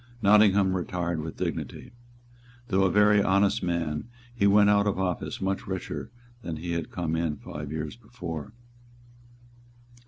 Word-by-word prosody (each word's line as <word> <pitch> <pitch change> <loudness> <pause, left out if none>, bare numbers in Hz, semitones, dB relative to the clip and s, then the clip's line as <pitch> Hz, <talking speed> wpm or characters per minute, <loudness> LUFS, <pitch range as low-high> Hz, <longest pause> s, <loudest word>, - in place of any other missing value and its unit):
Nottingham 100 -2 +5
retired 85 -2 -2
with 80 0 -7
dignity. - - -4 0.8
Though 95 0 +3
a - - +3
very 105 +1 +5
honest 100 +3 +2
man, 85 -2 -2 0.3
he 100 -4 +2
went 105 +1 +6
out 100 0 +3
of 100 - 0
office 90 -3 -2
much 95 0 -2
richer 95 -2 -4 0.3
than 85 -7 -4
he 85 +2 -5
had 85 -2 -2
come 85 -2 -2
in 80 -2 -1
five 75 0 -7
years 80 +5 -4
before. 105 - -7
95 Hz, 145 wpm, -27 LUFS, 85-100 Hz, 0.8 s, went